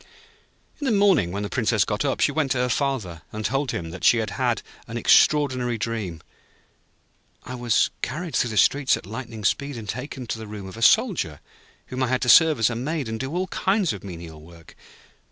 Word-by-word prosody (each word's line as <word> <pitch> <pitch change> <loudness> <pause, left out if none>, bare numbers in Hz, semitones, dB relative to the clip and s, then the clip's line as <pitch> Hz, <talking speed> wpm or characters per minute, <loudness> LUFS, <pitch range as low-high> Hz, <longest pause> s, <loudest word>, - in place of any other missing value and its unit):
In 290 - -4
the 260 - +1
morning 195 - +3
when 100 +2 -3
the - - -2
Princess 110 -4 +1
got 105 +3 -2
up, 135 -2 -1
she - - +3
went 145 -2 0
to - - -3
her 125 0 0
Father, 115 - -2
and 110 0 -5
told 135 0 0
him 85 -5 -4
that 95 - -9
she 120 - +5
had 110 -1 -2
had - - -1 0.2
an - - -5
extraordinary 130 -5 +3
dream. 105 -8 -4 1.2
'I 125 - -8
was 120 -3 +1
carried 155 +2 -4
through 120 - +1
the 110 - -4
streets 140 +5 +3
at - - -11
lightning 115 +1 -7
speed, 140 +5 0
and 110 -2 -8
taken 130 +3 -5
to 110 - -4
the 110 - -8
room 105 -2 -8
of 95 - -9
a 115 - -9
Soldier, 175 - +3 0.5
whom 130 0 -5
I 130 - +2
had 130 +1 0
to 125 - 0
serve 160 +1 +7
as 115 +1 +2
a - - -3
maid, 140 +3 -3
and 110 0 -4
do 135 +1 -4
all 185 +1 0
kinds 190 -3 +1
of 100 - -9
menial 85 -4 -9
work. 85 +1 -16
120 Hz, 215 wpm, -24 LUFS, 105-140 Hz, 1.2 s, serve